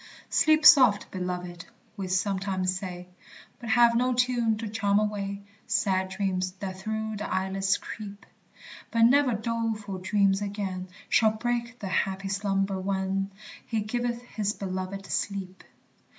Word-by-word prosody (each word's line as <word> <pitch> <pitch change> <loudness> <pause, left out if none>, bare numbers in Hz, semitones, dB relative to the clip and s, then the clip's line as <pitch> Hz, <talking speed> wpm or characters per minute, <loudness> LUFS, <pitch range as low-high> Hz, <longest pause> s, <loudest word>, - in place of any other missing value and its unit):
"Sleep 310 0 +4
soft, 250 -11 +7
beloved!" 180 -2 -5 0.3
we 195 -3 -4
sometimes 185 0 0
say, 180 -2 -6 0.5
But 235 - -7
have 235 +1 +5
no 250 +2 +2
tune 240 -3 +2
to 225 +1 -4
charm 205 -1 +1
away 200 -1 -2 0.2
Sad 195 -4 +1
dreams 185 -1 -1
that 190 -1 -6
through 220 +1 -3
the 210 - -5
eyelids 190 +1 +1
creep; 205 -2 -9 0.6
But 230 -1 +2
never 255 0 +5
doleful 220 -3 -3
dream 195 +1 +2
again 195 -3 -4 0.2
Shall 220 - +4
break 240 +2 -2
the 200 - -6
happy 195 +1 -1
slumber 195 -1 0
when 195 0 -1 0.3
"He 225 -2 -2
giveth 240 +2 -2
his 210 -4 -2
beloved 190 0 -5
sleep." 190 -2 -3
200 Hz, 135 wpm, -27 LUFS, 190-225 Hz, 0.6 s, soft